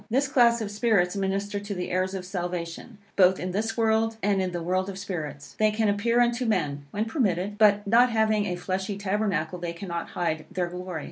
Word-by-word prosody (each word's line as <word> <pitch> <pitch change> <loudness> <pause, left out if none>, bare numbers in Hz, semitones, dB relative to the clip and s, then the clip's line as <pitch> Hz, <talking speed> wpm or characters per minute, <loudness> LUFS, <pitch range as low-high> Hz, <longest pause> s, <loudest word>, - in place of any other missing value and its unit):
This 265 +5 +2
class 240 -4 +4
of 205 -2 -3
spirits 205 -4 +2
minister 200 +1 -1
to 200 0 -5
the 180 -1 -4
heirs 185 +1 0
of 185 -1 -5
salvation, 180 +2 -5 0.2
both 185 -1 +5
in 180 +1 -3
this 220 +5 -2
world 225 0 +2
and 200 -1 +2
in 185 -1 -1
the 175 -1 -4
world 185 +2 0
of 190 - -6
spirits. 150 -8 -6
They 215 0 +5
can 215 0 +1
appear 230 +4 +2
unto 240 +1 +2
men, 145 -9 -1
when 210 +8 -2
permitted; 205 - -1
but 205 -1 +5
not 235 +5 +5
having 220 -2 +2
a 180 - -2
fleshly 190 +2 -3
tabernacle, 195 -4 -1
they 170 -1 -4
cannot 170 -1 -5
hide 160 -4 -2
their 180 -2 -1
glory. 180 -1 -5
195 Hz, 205 wpm, -26 LUFS, 180-220 Hz, 0.2 s, both